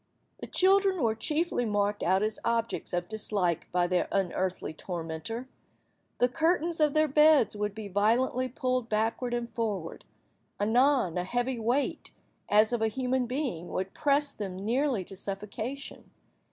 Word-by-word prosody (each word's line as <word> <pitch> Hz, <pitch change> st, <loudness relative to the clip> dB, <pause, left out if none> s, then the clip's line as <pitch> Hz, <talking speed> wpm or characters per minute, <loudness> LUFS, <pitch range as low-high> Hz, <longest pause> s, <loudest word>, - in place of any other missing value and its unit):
The -, -, -6 dB
children 385 Hz, 0 st, +3 dB
were 225 Hz, -2 st, +2 dB
chiefly 300 Hz, +5 st, 0 dB
marked 205 Hz, -2 st, 0 dB
out 190 Hz, +3 st, +2 dB
as 215 Hz, 0 st, 0 dB
objects 230 Hz, 0 st, -1 dB
of 175 Hz, 0 st, -2 dB
dislike 200 Hz, -6 st, -1 dB
by 180 Hz, 0 st, +2 dB
their 180 Hz, 0 st, +1 dB
unearthly 185 Hz, -3 st, -1 dB
tormenter. 175 Hz, +8 st, -5 dB, 0.7 s
The 245 Hz, -, +4 dB
curtains 330 Hz, +4 st, +1 dB
of 300 Hz, -1 st, +3 dB
their 310 Hz, 0 st, +4 dB
beds 300 Hz, -6 st, +5 dB
would 210 Hz, -1 st, -3 dB
be 215 Hz, -2 st, -6 dB
violently 230 Hz, +6 st, +1 dB
pulled 255 Hz, -2 st, -1 dB
backward 225 Hz, +3 st, 0 dB
and 240 Hz, -1 st, -4 dB
forward. 205 Hz, -8 st, -3 dB, 0.6 s
Anon, 235 Hz, -, +3 dB
a -, -, -1 dB
heavy 245 Hz, +5 st, -1 dB
weight, 245 Hz, +6 st, -1 dB, 0.4 s
as 215 Hz, +3 st, +4 dB
of 235 Hz, -, 0 dB
a 220 Hz, -, +3 dB
human 255 Hz, +2 st, -1 dB
being, 250 Hz, -, -3 dB
would 190 Hz, +1 st, -4 dB
press 290 Hz, -1 st, +1 dB
them 195 Hz, -2 st, -6 dB
nearly 250 Hz, -2 st, +1 dB
to 195 Hz, -, -9 dB
suffocation. 210 Hz, +8 st, -5 dB
225 Hz, 150 wpm, -29 LUFS, 200-260 Hz, 0.7 s, beds